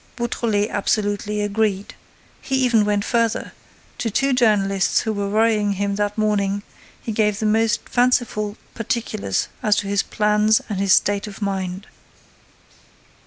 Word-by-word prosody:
Beautrelet 230 Hz, -3 st, -1 dB
absolutely 205 Hz, 0 st, -1 dB
agreed. 205 Hz, -1 st, -1 dB, 0.5 s
He 270 Hz, -, -2 dB
even 240 Hz, -5 st, +3 dB
went 205 Hz, 0 st, 0 dB
further: 230 Hz, -2 st, 0 dB, 0.5 s
to 230 Hz, -, -1 dB
two 270 Hz, +5 st, +1 dB
journalists 200 Hz, -5 st, +2 dB
who 220 Hz, -, -2 dB
were 200 Hz, -1 st, -2 dB
worrying 215 Hz, -1 st, +2 dB
him 200 Hz, +1 st, -1 dB
that 205 Hz, 0 st, -1 dB
morning 205 Hz, -2 st, 0 dB, 0.4 s
he 225 Hz, -, -5 dB
gave 210 Hz, -1 st, +1 dB
the 220 Hz, -, -2 dB
most 220 Hz, +1 st, +1 dB
fanciful 240 Hz, -4 st, +1 dB, 0.2 s
particulars 215 Hz, -, -2 dB
as 210 Hz, -1 st, +3 dB
to 200 Hz, -, -2 dB
his 200 Hz, 0 st, +1 dB
plans 210 Hz, +1 st, +2 dB
and 200 Hz, -3 st, -3 dB
his 195 Hz, -1 st, +1 dB
state 205 Hz, +1 st, +2 dB
of 200 Hz, -, -9 dB
mind. 190 Hz, -1 st, -3 dB
210 Hz, 140 wpm, -21 LUFS, 200-225 Hz, 0.5 s, even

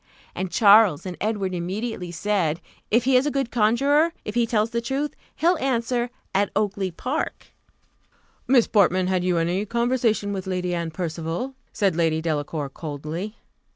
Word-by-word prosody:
_" -, -, -40 dB, 0.3 s
And 190 Hz, 0 st, -3 dB
Charles 205 Hz, -6 st, +5 dB
and 180 Hz, -1 st, -5 dB
Edward 205 Hz, -3 st, -1 dB
immediately 185 Hz, +2 st, -3 dB
said, 170 Hz, -2 st, 0 dB, 0.3 s
"if 235 Hz, +2 st, +3 dB
he 260 Hz, +1 st, +3 dB
is 255 Hz, +3 st, +4 dB
a -, -, +3 dB
good 275 Hz, -4 st, -2 dB
conjuror, 275 Hz, +9 st, +3 dB
if 210 Hz, -, -4 dB
he 235 Hz, 0 st, +2 dB
tells 220 Hz, 0 st, +1 dB
truth, 270 Hz, +5 st, -2 dB, 0.2 s
he'll 345 Hz, +2 st, +2 dB
answer, 245 Hz, -2 st, 0 dB, 0.2 s
'At 200 Hz, +1 st, +2 dB
Oakly 200 Hz, -2 st, 0 dB
park.'" 255 Hz, -, -4 dB, 1.0 s
"Miss 250 Hz, -3 st, +5 dB
Portman, 185 Hz, -3 st, +3 dB
had 185 Hz, -1 st, 0 dB
you 180 Hz, -1 st, +1 dB
any 175 Hz, +4 st, 0 dB
conversation 235 Hz, -2 st, 0 dB
with 190 Hz, -1 st, -5 dB
Lady 180 Hz, -1 st, -1 dB
Anne 170 Hz, -1 st, -2 dB
Percival?" 170 Hz, +8 st, -4 dB, 0.2 s
said 195 Hz, -5 st, +1 dB
Lady 160 Hz, -2 st, +1 dB
Delacour, 150 Hz, -2 st, -2 dB
coldly. 155 Hz, +8 st, -6 dB
200 Hz, 155 wpm, -24 LUFS, 175-235 Hz, 1.0 s, Charles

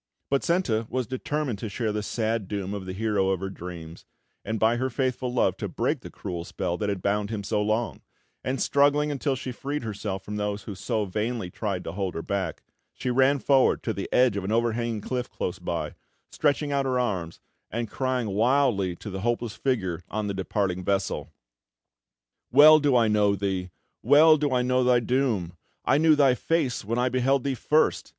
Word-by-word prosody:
But 140 Hz, -, +2 dB
Senta 125 Hz, -11 st, +1 dB
was 130 Hz, -1 st, -1 dB
determined 130 Hz, -1 st, -3 dB
to 110 Hz, -, -4 dB
share 110 Hz, +2 st, -2 dB
the 105 Hz, 0 st, -2 dB
sad 110 Hz, -1 st, -2 dB
doom 100 Hz, -1 st, -3 dB
of 100 Hz, -2 st, -6 dB
the 95 Hz, -, -4 dB
hero 100 Hz, -2 st, 0 dB
of 95 Hz, -2 st, 0 dB
her 95 Hz, +1 st, -4 dB
dreams, 85 Hz, -3 st, -9 dB, 0.4 s
and 110 Hz, +2 st, -3 dB
by 115 Hz, +2 st, +3 dB
her 130 Hz, +2 st, -1 dB
faithful 130 Hz, 0 st, -1 dB
love 125 Hz, -, +1 dB
to -, -, -3 dB
break -, -, -1 dB
the -, -, -10 dB
cruel 85 Hz, -2 st, -6 dB
spell 85 Hz, 0 st, -3 dB
that 105 Hz, -, -1 dB
had 100 Hz, -3 st, -3 dB
bound 100 Hz, 0 st, 0 dB
him 110 Hz, -2 st, -4 dB
so 105 Hz, +1 st, 0 dB
long; 110 Hz, +2 st, -1 dB, 0.4 s
and 130 Hz, +1 st, -2 dB
struggling 145 Hz, +1 st, +3 dB
until 140 Hz, -1 st, -1 dB
she 130 Hz, 0 st, -5 dB
freed 140 Hz, +3 st, -4 dB
herself 100 Hz, -3 st, -4 dB
from 105 Hz, 0 st, -5 dB
those 105 Hz, -1 st, -2 dB
who 105 Hz, -, -6 dB
so 105 Hz, +3 st, -2 dB
vainly 105 Hz, 0 st, -3 dB
tried 100 Hz, -3 st, -3 dB
to -, -, -5 dB
hold 95 Hz, 0 st, -3 dB
her 80 Hz, -, -4 dB
back, 100 Hz, -1 st, -3 dB, 0.3 s
she 125 Hz, -, -2 dB
ran 135 Hz, +3 st, +4 dB
forward 135 Hz, -1 st, +3 dB
to 110 Hz, -, -1 dB
the 100 Hz, -, -5 dB
edge 125 Hz, -4 st, +4 dB
of 100 Hz, -, -2 dB
an 95 Hz, -, -3 dB
overhanging 115 Hz, -1 st, 0 dB
cliff 125 Hz, +3 st, -3 dB
close 90 Hz, -, -4 dB
by, 85 Hz, -3 st, -3 dB, 0.4 s
stretching 145 Hz, 0 st, +1 dB
out 140 Hz, -1 st, +1 dB
her 130 Hz, -1 st, +1 dB
arms, 95 Hz, -9 st, -2 dB, 0.3 s
and 115 Hz, +1 st, -3 dB
crying 125 Hz, 0 st, -1 dB
wildly 110 Hz, -4 st, +2 dB
to 105 Hz, -, -8 dB
the 95 Hz, 0 st, -5 dB
hopeless 120 Hz, 0 st, -1 dB
figure 95 Hz, -11 st, -1 dB
on 110 Hz, 0 st, -2 dB
the 100 Hz, -, -2 dB
departing 95 Hz, -1 st, -1 dB
vessel: 100 Hz, +1 st, -1 dB, 1.2 s
"Well 155 Hz, +4 st, +9 dB
do 145 Hz, -3 st, +2 dB
I 115 Hz, -2 st, +4 dB
know 105 Hz, -1 st, +3 dB
thee 95 Hz, -2 st, -2 dB, 0.3 s
Well 155 Hz, +2 st, +6 dB
do 145 Hz, -1 st, 0 dB
I 125 Hz, -1 st, +2 dB
know 125 Hz, 0 st, +2 dB
thy 125 Hz, -1 st, +4 dB
doom! 115 Hz, -8 st, 0 dB, 0.3 s
I 140 Hz, -, +3 dB
knew 160 Hz, -1 st, +5 dB
thy 140 Hz, -3 st, +5 dB
face 145 Hz, -1 st, 0 dB
when 115 Hz, +4 st, -2 dB
I 125 Hz, +1 st, +2 dB
beheld 130 Hz, +1 st, +1 dB
thee 140 Hz, -, 0 dB
first! 150 Hz, +5 st, +1 dB
115 Hz, 200 wpm, -26 LUFS, 100-130 Hz, 1.2 s, Well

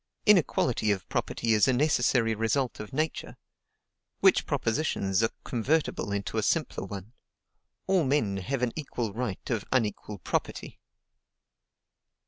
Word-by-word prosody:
Inequality 145 Hz, -, +3 dB
of 100 Hz, -3 st, 0 dB
property 115 Hz, -1 st, 0 dB
is 105 Hz, -2 st, +4 dB
a 130 Hz, -, +3 dB
necessary 125 Hz, -4 st, +2 dB
result 115 Hz, +4 st, 0 dB
of 105 Hz, -, -7 dB
Nature, 155 Hz, +3 st, -3 dB, 0.8 s
which -, -, +4 dB
propositions 110 Hz, -6 st, 0 dB
are 115 Hz, -, +2 dB
convertible 130 Hz, -2 st, 0 dB
into 100 Hz, -1 st, -2 dB
a -, -, +1 dB
simpler -, -, 0 dB
one: 100 Hz, +3 st, -8 dB, 0.7 s
All 190 Hz, -3 st, +3 dB
men 130 Hz, -8 st, +1 dB
have 125 Hz, +7 st, -2 dB
an 120 Hz, -, 0 dB
equal 120 Hz, -8 st, -4 dB
right 115 Hz, -4 st, -4 dB
of 110 Hz, -4 st, 0 dB
unequal 105 Hz, -4 st, -1 dB
property. -, -, -3 dB
115 Hz, 125 wpm, -28 LUFS, 105-135 Hz, 0.8 s, is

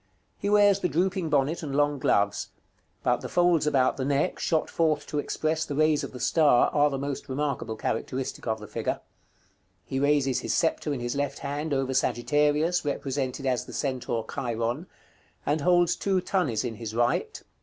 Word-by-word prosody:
He 200 Hz, -, -1 dB
wears 205 Hz, -1 st, +5 dB
the 180 Hz, -, 0 dB
drooping 180 Hz, +2 st, 0 dB
bonnet 145 Hz, +3 st, +1 dB
and 140 Hz, -4 st, -4 dB
long 145 Hz, -1 st, +2 dB
gloves; 100 Hz, -3 st, +1 dB, 0.6 s
but -, -, +1 dB
the -, -, -6 dB
folds 175 Hz, -3 st, +3 dB
about 130 Hz, -3 st, +2 dB
the 135 Hz, -, -2 dB
neck, 140 Hz, +5 st, 0 dB
shot 160 Hz, -2 st, +1 dB
forth 155 Hz, -3 st, 0 dB
to 150 Hz, -, -2 dB
express 155 Hz, +2 st, -1 dB
the 145 Hz, -, -4 dB
rays 155 Hz, 0 st, +3 dB
of -, -, -5 dB
the 125 Hz, -, -9 dB
star, 150 Hz, -5 st, +4 dB
are 145 Hz, 0 st, +4 dB
the 135 Hz, -, -3 dB
most 140 Hz, 0 st, -4 dB
remarkable 130 Hz, -5 st, -2 dB
characteristic 125 Hz, +4 st, -3 dB
of 110 Hz, -1 st, -1 dB
the 105 Hz, -, -9 dB
figure. -, -, -3 dB, 0.9 s
He 135 Hz, -, -3 dB
raises 140 Hz, -2 st, +2 dB
his -, -, -1 dB
sceptre 160 Hz, -2 st, 0 dB
in 135 Hz, -4 st, -3 dB
his 120 Hz, 0 st, -2 dB
left 140 Hz, -1 st, -2 dB
hand 145 Hz, +3 st, -4 dB
over 135 Hz, -1 st, 0 dB
Sagittarius, 150 Hz, +8 st, +1 dB
represented 135 Hz, -2 st, -2 dB
as 125 Hz, -2 st, 0 dB
the -, -, -10 dB
centaur 125 Hz, -4 st, -2 dB
Chiron; 120 Hz, +4 st, -2 dB, 0.6 s
and 150 Hz, +2 st, +1 dB
holds 175 Hz, +1 st, +3 dB
two 195 Hz, -2 st, +1 dB
thunnies 175 Hz, -, 0 dB
in 115 Hz, -3 st, -4 dB
his 115 Hz, -1 st, -6 dB
right. 120 Hz, +1 st, 0 dB
145 Hz, 180 wpm, -27 LUFS, 130-155 Hz, 0.9 s, wears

